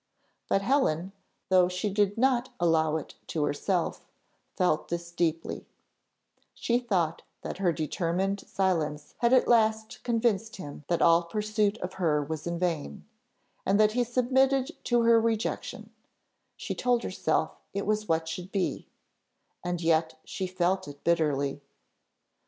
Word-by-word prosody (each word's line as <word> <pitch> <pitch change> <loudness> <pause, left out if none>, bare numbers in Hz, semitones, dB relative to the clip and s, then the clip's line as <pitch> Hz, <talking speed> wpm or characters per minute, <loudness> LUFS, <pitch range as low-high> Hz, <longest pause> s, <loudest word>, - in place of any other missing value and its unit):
But 195 - +2
Helen, 195 - +1 0.4
though 185 -1 +5
she 180 +4 -2
did 205 0 +1
not 255 0 +2
allow 160 -2 +2
it 155 - -8
to 155 - -1
herself, 170 +5 -1 0.5
felt 180 -5 +1
this 170 0 -4
deeply: 165 -1 -2 0.9
she 240 +1 +1
thought 180 -9 0 0.2
that - - -5
her 185 -3 +3
determined 175 +5 -1
silence 155 -6 -1
had 235 -1 +3
at 255 -1 +5
last 220 0 +2
convinced 225 -2 0
him 150 -4 -9
that 170 - +1
all 170 +1 +5
pursuit 210 +3 0
of 180 +1 -4
her 150 -4 +2
was 155 +2 -5
vain; 170 - -2 0.6
and 200 +2 +2
that 215 0 +5
he 245 +2 +1
submitted 265 +4 +2
to 240 -1 +3
her 230 0 +5
rejection: 225 -1 -2 0.7
she - - -4
told 245 -1 +1
herself 160 -3 -1
it 200 0 -3
was 215 0 0
what 160 0 +1
should 180 +3 -6
be, 195 -3 -2 0.8
and 175 -1 -2
yet 160 -1 +2
she 190 - -4
felt 185 +1 0
it 145 0 -11
bitterly. 145 -4 +1
185 Hz, 140 wpm, -28 LUFS, 165-220 Hz, 0.9 s, though